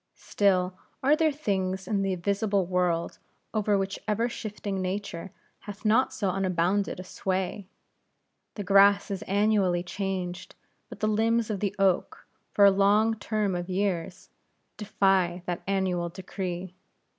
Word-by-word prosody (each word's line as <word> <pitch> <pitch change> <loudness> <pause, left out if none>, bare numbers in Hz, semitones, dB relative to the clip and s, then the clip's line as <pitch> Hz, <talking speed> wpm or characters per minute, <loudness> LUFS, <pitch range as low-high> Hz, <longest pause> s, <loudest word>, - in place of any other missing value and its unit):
Still, 185 -2 +1 0.3
are 285 +3 +5
there 315 0 +2
things 190 -9 -2
in 205 -3 0
the 195 -1 0
visible 200 +1 0
world, 175 -2 -1 0.3
over 210 -2 +2
which 195 0 -2
ever 220 +3 +1
shifting 210 -4 -5
Nature 185 -1 -4 0.4
hath 205 +1 -9
not 225 +5 +3
so 195 -3 -1
unbounded 190 +1 0
a - - -5
sway. 190 +1 -3 0.9
The 205 - -4
grass 200 +1 +5
is 195 - -3
annually 200 -3 +2
changed; 185 -1 -4 0.3
but - - -11
the 215 - +2
limbs 225 +1 +1
of 200 - -2
the 200 0 -2
oak, 195 -2 +1 0.3
for 200 - +5
a 200 - +8
long 205 +3 +3
term 215 -2 -1
of 175 +1 -4
years, 185 -1 -2 0.4
defy 195 -4 +1
that 175 -1 -3
annual 185 -3 0
decree. 185 0 -5
195 Hz, 140 wpm, -27 LUFS, 185-205 Hz, 0.9 s, a